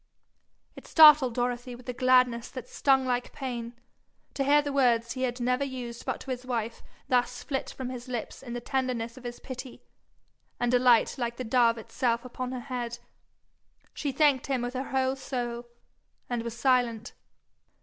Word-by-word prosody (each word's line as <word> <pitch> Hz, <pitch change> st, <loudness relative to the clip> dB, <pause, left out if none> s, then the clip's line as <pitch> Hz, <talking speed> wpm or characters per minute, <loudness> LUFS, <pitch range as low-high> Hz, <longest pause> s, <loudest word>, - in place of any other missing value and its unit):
It -, -, -12 dB
startled 300 Hz, -6 st, +7 dB
Dorothy 245 Hz, 0 st, -2 dB
with 245 Hz, +1 st, -15 dB
a 250 Hz, -, -2 dB
gladness 250 Hz, -1 st, +3 dB
that 255 Hz, -2 st, -8 dB
stung 265 Hz, -1 st, +2 dB
like 245 Hz, -1 st, -1 dB
pain, 240 Hz, -3 st, -5 dB, 0.6 s
to 275 Hz, -, -1 dB
hear 290 Hz, +2 st, +5 dB
the 285 Hz, -1 st, -3 dB
word 245 Hz, -4 st, +3 dB
he 255 Hz, -1 st, -1 dB
never 250 Hz, +2 st, +1 dB
used 250 Hz, -3 st, -6 dB
but -, -, -2 dB
to 265 Hz, -, -6 dB
his 250 Hz, 0 st, -4 dB
wife 235 Hz, -3 st, -3 dB, 0.3 s
thus 250 Hz, -1 st, +1 dB
flit 270 Hz, -3 st, -3 dB
from 260 Hz, -1 st, -6 dB
his 250 Hz, 0 st, -7 dB
lips 245 Hz, -3 st, -5 dB
in 245 Hz, -3 st, -7 dB
the 240 Hz, -, -4 dB
tenderness 245 Hz, -3 st, -2 dB
of 255 Hz, -, -13 dB
his 240 Hz, 0 st, -6 dB
pity, 255 Hz, -1 st, -8 dB, 0.8 s
and 245 Hz, 0 st, +1 dB
alight 245 Hz, 0 st, +4 dB
like 235 Hz, -1 st, -2 dB
the 255 Hz, -, -3 dB
dove 235 Hz, 0 st, +3 dB
itself 235 Hz, +1 st, -1 dB
upon 250 Hz, 0 st, -5 dB
her 255 Hz, -1 st, -4 dB
head. 240 Hz, -2 st, -4 dB, 1.0 s
She 285 Hz, -, -2 dB
thanked 275 Hz, -1 st, +3 dB
him 265 Hz, -3 st, 0 dB
with 245 Hz, +1 st, -3 dB
her 260 Hz, +1 st, -4 dB
whole 265 Hz, 0 st, +1 dB
soul, 240 Hz, -3 st, -4 dB, 0.6 s
and 240 Hz, -1 st, -2 dB
was 235 Hz, 0 st, -6 dB
silent. 245 Hz, -3 st, +1 dB
250 Hz, 170 wpm, -28 LUFS, 240-260 Hz, 1.0 s, startled